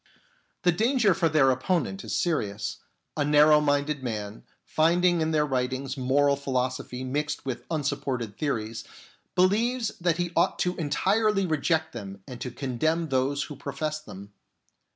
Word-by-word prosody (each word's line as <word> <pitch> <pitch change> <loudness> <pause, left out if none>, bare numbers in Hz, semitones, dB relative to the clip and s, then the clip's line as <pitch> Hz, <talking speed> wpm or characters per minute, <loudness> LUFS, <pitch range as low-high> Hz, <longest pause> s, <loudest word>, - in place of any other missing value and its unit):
The 175 - +5
danger 225 +2 +3
for 165 0 +1
their 145 -3 +4
opponent 180 +8 -1
is - - -2
serious. 105 - -1 0.4
A 150 - +1
narrow 150 +1 +6
minded 145 0 0
man, 110 -4 -5 0.2
finding 170 +2 +2
in 160 - +1
their 155 -2 +2
writings 130 0 -2
moral 140 +2 +2
philosophy 130 -2 -2
mixed 150 +3 -2
with 125 -2 -5
unsupported 135 -8 -2
theories, 115 -7 -3 0.5
believes 225 +6 +2
that 170 -1 +2
he 175 -1 -1
ought 170 - +2
to 180 0 0
entirely 195 +6 +1
reject 160 0 0
them 100 -4 -8
and 125 -1 -9
to 125 - -3
condemn 150 +6 -1
those 135 +2 +1
who 150 - -8
profess 150 +3 -4
them. 100 -7 -11
145 Hz, 145 wpm, -27 LUFS, 130-170 Hz, 0.5 s, narrow